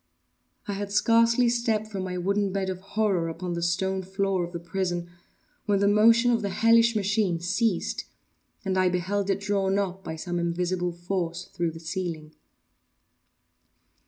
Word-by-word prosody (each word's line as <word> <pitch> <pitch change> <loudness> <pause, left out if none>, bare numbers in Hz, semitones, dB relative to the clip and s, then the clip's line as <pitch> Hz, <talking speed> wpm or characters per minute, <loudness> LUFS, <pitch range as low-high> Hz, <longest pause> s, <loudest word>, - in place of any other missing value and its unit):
I 205 - -2
had 200 0 -4
scarcely 230 +3 +4
stepped 235 -2 +1
from 200 -3 -5
my 180 -1 -4
wooden 200 +2 0
bed 190 -1 -1
of 185 - -6
horror 195 -4 0
upon 175 +2 -4
the 170 - -3
stone 190 +3 0
floor 190 0 -1
of 170 - -5
the 170 - -5
prison, 175 0 -3 0.6
when 205 -1 +3
the 200 +1 +2
motion 230 +4 +5
of 230 -1 +2
the 200 - -2
hellish 230 +3 +4
machine 200 -4 +1
ceased 190 +3 -1 0.6
and 190 -1 +1
I 185 -1 +4
beheld 190 +3 -1
it 195 0 +1
drawn 200 -1 0
up, 190 -1 -2
by 160 - -5
some 175 +2 -3
invisible 175 +1 -1
force, 175 0 -3
through 170 -2 0
the 165 0 -9
ceiling. 165 -2 -5
190 Hz, 160 wpm, -26 LUFS, 175-205 Hz, 0.6 s, motion